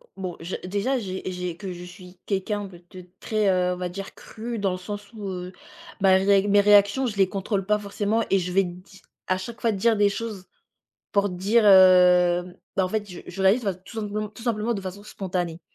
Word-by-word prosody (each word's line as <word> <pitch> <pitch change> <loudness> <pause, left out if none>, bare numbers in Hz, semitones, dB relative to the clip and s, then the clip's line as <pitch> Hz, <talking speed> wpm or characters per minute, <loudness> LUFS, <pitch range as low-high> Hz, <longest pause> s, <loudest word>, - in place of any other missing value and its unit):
bon, 185 -3 -5
j 170 +3 -5
déjà 205 +8 -1
que - - -3
j'ai 190 -1 -5
j'ai 180 -2 -5
que 190 -2 -6
je 175 0 -9
suis 180 0 -13
quelqu'un 205 +1 -2
de 175 -2 -15
de 185 -1 -11
très, 215 -2 0
heu, 180 -1 +2
on - - -6
va 180 -1 -3
dire 195 +2 -7
cru, 230 0 -7
dans 195 -2 0
le - - -4
sens 205 +3 -8
où, 210 -3 -7
heu, 180 0 -6 0.5
bah, 190 -1 +5
ré 200 +1 +3
mes 205 0 +5
réactions, 205 +5 +4
je 210 -3 -5
les 195 -1 +4
contrôle 195 0 -2
pas 210 0 +2
forcément 210 +2 -1
et 195 - +4
je 180 0 -3
vais 195 +1 +3
di 180 +2 -10 0.3
à 185 - +1
chaque 235 +5 -8
fois 230 -2 +2
dire 220 +3 +2
des 205 -1 +4
choses 205 -3 -5 0.7
pour 200 0 +2
dire, 200 +5 +2
heu, 180 -2 +6 0.2
bah, 190 -1 +2
fait 215 +1 -2
je 175 - -9
je 195 - -5
réalise, 210 +5 +4
bah, 195 -3 0
tout 185 +5 -14
simplement 210 0 -3
tout 220 +2 -13
simplement 230 0 0
de 200 - -4
façon 190 +2 -7
spontanée. 180 -4 -4
195 Hz, 220 wpm, -24 LUFS, 180-210 Hz, 0.7 s, heu